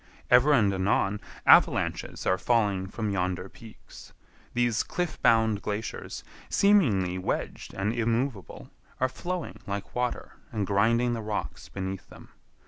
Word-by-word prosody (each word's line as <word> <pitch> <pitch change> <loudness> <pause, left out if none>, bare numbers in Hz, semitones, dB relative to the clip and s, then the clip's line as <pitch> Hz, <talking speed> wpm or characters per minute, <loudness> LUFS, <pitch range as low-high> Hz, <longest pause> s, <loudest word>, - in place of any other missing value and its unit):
Ever 125 +4 +6
and 105 -8 +4
anon, 95 +1 +1 0.2
avalanches - - +3
are 95 - +2
falling 100 -6 +1
from 105 +1 -3
yonder 90 -1 -2
peaks. 110 +2 -14 0.4
These 120 -2 +2
cliff 175 -3 -3
bound 110 -2 +3
glaciers, 105 +1 -5 0.3
seemingly 105 - +3
wedged 90 - -4
and 100 +4 -1
immovable, 115 -2 -2 0.3
are 130 - +3
flowing 175 +5 -5
like 100 0 -5
water 125 0 -3
and 105 -3 -1
grinding 115 +5 +2
the 115 - -3
rocks 105 -1 -5
beneath 95 -1 -5
them. - - -14
110 Hz, 130 wpm, -27 LUFS, 100-120 Hz, 0.4 s, Ever